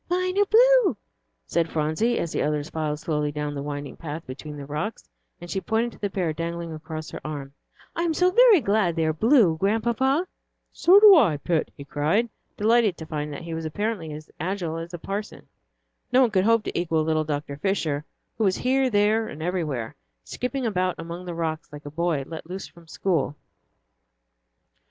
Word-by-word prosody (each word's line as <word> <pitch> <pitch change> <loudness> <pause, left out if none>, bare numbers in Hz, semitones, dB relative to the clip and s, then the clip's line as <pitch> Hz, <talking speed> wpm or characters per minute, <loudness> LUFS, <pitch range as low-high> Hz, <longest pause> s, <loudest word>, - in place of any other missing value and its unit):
"Mine 365 +1 0
are 410 - +5
blue," - - +5 0.5
said 170 -1 0
Phronsie, 160 +11 0
as 170 - -2
the - - -1
others 150 +1 -1
filed 155 -2 -2
slowly 150 -1 -1
down 150 0 -3
the 140 - -4
winding 145 0 -5
path 160 0 -7
between 145 +3 -8
the 140 - -7
rocks, 150 +10 -4 0.3
and 175 - -9
she 190 +2 -2
pointed 225 +3 0
to - - -16
the 205 - -1
pair 180 -5 -1
dangling 170 +1 -4
across 155 +1 -7
her - - -7
arm. 140 -3 -6 0.4
"I - - -1
am 335 -2 0
so 360 +2 +3
very 460 -4 +7
glad 200 -6 +1
they 165 -1 +1
are 155 - +1
blue, 215 - +4
Grandpapa." 235 - +1 0.5
"So 360 - +5
am 410 0 +10
I, 210 - +5
Pet," 160 +2 -1
he 140 - -8
cried, 155 - +1 0.3
delighted 220 -3 +3
to 160 - -7
find 150 -1 -4
that 145 - -7
he 165 0 -6
was 160 0 -4
apparently 175 +1 -3
as 150 +1 -9
agile 175 -2 -2
as 165 +1 -6
the 175 - -6
parson. 200 +5 -6 0.6
No 255 +1 +5
one 245 -4 +4
could 190 -2 +2
hope 230 -1 +4
to - - -5
equal 165 -2 +1
little 155 0 +1
Dr. 145 -2 -4
Fisher, 155 -4 -1 0.4
who - - +2
was 190 -2 +2
here, 260 +1 +2
there, 215 +1 +2
and 155 - -7
everywhere, 155 -10 -2 0.3
skipping 255 +1 -3
about 185 -4 0
among 170 +2 -7
the 175 -1 -5
rocks 160 -2 -3
like 145 0 -10
a 145 - -7
boy 165 -2 0
let 160 +1 -8
loose 190 +2 -5
from 170 -2 -17
school. 160 -4 -1
170 Hz, 195 wpm, -25 LUFS, 155-220 Hz, 0.6 s, am